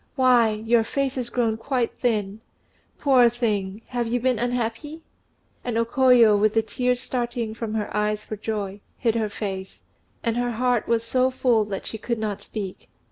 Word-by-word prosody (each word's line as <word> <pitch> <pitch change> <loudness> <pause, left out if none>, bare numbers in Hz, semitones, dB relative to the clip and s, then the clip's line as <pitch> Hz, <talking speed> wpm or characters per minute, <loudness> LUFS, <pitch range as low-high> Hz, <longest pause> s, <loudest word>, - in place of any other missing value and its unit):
Why, 250 -4 +5
your 225 +2 +2
face 275 +3 -1
has 250 -3 -4
grown 230 -3 0
quite 245 +1 -2
thin. 215 -3 -1 0.6
Poor 255 -4 +5
thing! 215 -3 -2
have 240 -2 -1
you 245 +2 0
been 250 -2 +1
unhappy?" 245 +6 -3 0.6
And 240 -2 -2
O 230 - +2
Koyo, 240 -3 +5
with 215 +1 +2
the 225 - +3
tears 250 +2 0
starting 240 -3 -3
from 220 -1 -4
her 210 -2 -3
eyes 210 0 0
for 215 - -5
joy, 205 -2 -4 0.2
hid 230 -2 +1
her 220 -2 -1
face; 195 -2 -6 0.4
and 230 -1 0
her 245 0 0
heart 245 0 +1
was 230 -1 +1
so 255 +2 +2
full 245 -4 +2
that 200 -2 -5
she 220 - -6
could 235 +2 -2
not 215 -2 -3
speak. 195 -4 -7
230 Hz, 180 wpm, -24 LUFS, 215-245 Hz, 0.6 s, Why